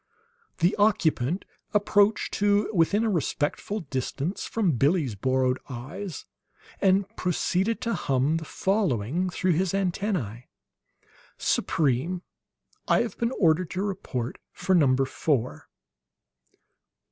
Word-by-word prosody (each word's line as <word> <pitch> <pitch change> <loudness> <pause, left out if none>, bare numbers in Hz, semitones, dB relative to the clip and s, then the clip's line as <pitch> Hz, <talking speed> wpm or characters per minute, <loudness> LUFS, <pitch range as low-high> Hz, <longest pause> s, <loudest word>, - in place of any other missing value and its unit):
The 175 +5 +2
occupant 185 - +2 0.3
approached 205 0 +3
to 205 +1 +2
within 200 +5 +3
a 225 - +1
respectful 175 +4 -1
distance 140 +4 -3
from 210 -6 +1
Billie's 140 - +2
borrowed 130 +4 +1
eyes, 150 +9 -6 0.6
and 195 0 +3
proceeded 185 +5 0
to 230 -2 -1
hum 135 +4 +1
the 160 - -6
following 180 - 0
through 180 +1 0
his 185 +3 +1
antennae: 180 - -2 0.9
"Supreme, 160 +5 0 0.6
I - - +4
have 230 -5 -5
been 235 +1 +1
ordered 165 -1 +3
to 190 - 0
report 135 - -4
for 185 +1 -1
Number 135 -6 +4
Four." 130 - -2
175 Hz, 110 wpm, -26 LUFS, 135-200 Hz, 0.9 s, I